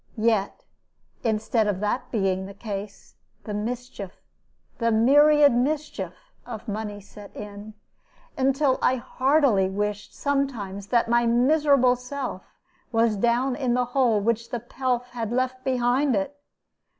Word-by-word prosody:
Yet, 215 Hz, -3 st, 0 dB, 0.6 s
instead 220 Hz, 0 st, +1 dB
of 200 Hz, -3 st, -1 dB
that 210 Hz, +5 st, -1 dB
being 190 Hz, -3 st, 0 dB
the 200 Hz, -, -11 dB
case, 205 Hz, -1 st, -7 dB, 0.3 s
the 210 Hz, -, -5 dB
mischief, 220 Hz, -2 st, -5 dB, 0.7 s
the 230 Hz, -1 st, +2 dB
myriad 290 Hz, +5 st, +6 dB
mischief, 245 Hz, -, -1 dB, 0.3 s
of 230 Hz, -3 st, -8 dB
money 210 Hz, -1 st, -4 dB
set 205 Hz, 0 st, -14 dB
in, 210 Hz, +1 st, -9 dB, 0.6 s
until 270 Hz, 0 st, +2 dB
I 255 Hz, -, +3 dB
heartily 260 Hz, -5 st, +2 dB
wished 205 Hz, +1 st, -3 dB
sometimes 235 Hz, -9 st, -2 dB
that 235 Hz, 0 st, +2 dB
my 235 Hz, 0 st, +3 dB
miserable 255 Hz, +1 st, +4 dB
self 255 Hz, +2 st, -5 dB, 0.5 s
was 225 Hz, -2 st, +2 dB
down 240 Hz, +5 st, +1 dB
in 255 Hz, -3 st, 0 dB
the 250 Hz, 0 st, +1 dB
hole 245 Hz, -6 st, +3 dB
which 230 Hz, +2 st, -1 dB
the 240 Hz, -, -3 dB
pelf 245 Hz, +1 st, -2 dB
had 230 Hz, -3 st, -4 dB
left 255 Hz, +1 st, -1 dB
behind 255 Hz, +1 st, +1 dB
it. 200 Hz, +9 st, -2 dB
235 Hz, 130 wpm, -25 LUFS, 210-260 Hz, 0.7 s, myriad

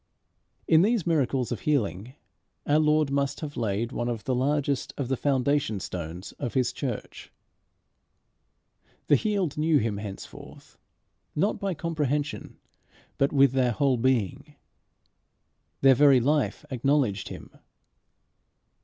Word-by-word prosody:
In 160 Hz, 0 st, +6 dB
these 215 Hz, -1 st, +2 dB
miracles 135 Hz, -7 st, 0 dB
of 120 Hz, -, -2 dB
healing 125 Hz, -4 st, -1 dB, 0.5 s
our 150 Hz, +1 st, +3 dB
Lord 155 Hz, -2 st, +2 dB
must 140 Hz, 0 st, -1 dB
have 150 Hz, -2 st, -6 dB
laid 115 Hz, +1 st, -2 dB
one 120 Hz, -1 st, -2 dB
of 115 Hz, -3 st, -4 dB
the 130 Hz, -, -1 dB
largest 140 Hz, +2 st, -1 dB
of 135 Hz, -3 st, -3 dB
the 135 Hz, -, +1 dB
foundation 135 Hz, -4 st, 0 dB
stones 85 Hz, 0 st, -6 dB
of 125 Hz, -3 st, -4 dB
his 130 Hz, -2 st, +1 dB
church. 125 Hz, -6 st, -6 dB, 1.7 s
The 145 Hz, -, +5 dB
healed 190 Hz, -, -1 dB
knew 155 Hz, 0 st, +3 dB
him 110 Hz, -5 st, -1 dB
henceforth, 100 Hz, -1 st, -10 dB, 0.6 s
not 195 Hz, +8 st, 0 dB
by 195 Hz, -3 st, -2 dB
comprehension, 150 Hz, -3 st, -3 dB, 0.6 s
but 140 Hz, -, +2 dB
with 140 Hz, -2 st, +5 dB
their 130 Hz, -2 st, +1 dB
whole 135 Hz, 0 st, +2 dB
being. 120 Hz, -5 st, -1 dB, 1.3 s
Their 135 Hz, -1 st, +7 dB
very 140 Hz, 0 st, +6 dB
life 150 Hz, +4 st, 0 dB
acknowledged 125 Hz, -6 st, 0 dB
him. -, -, -10 dB
135 Hz, 125 wpm, -26 LUFS, 120-150 Hz, 1.7 s, Their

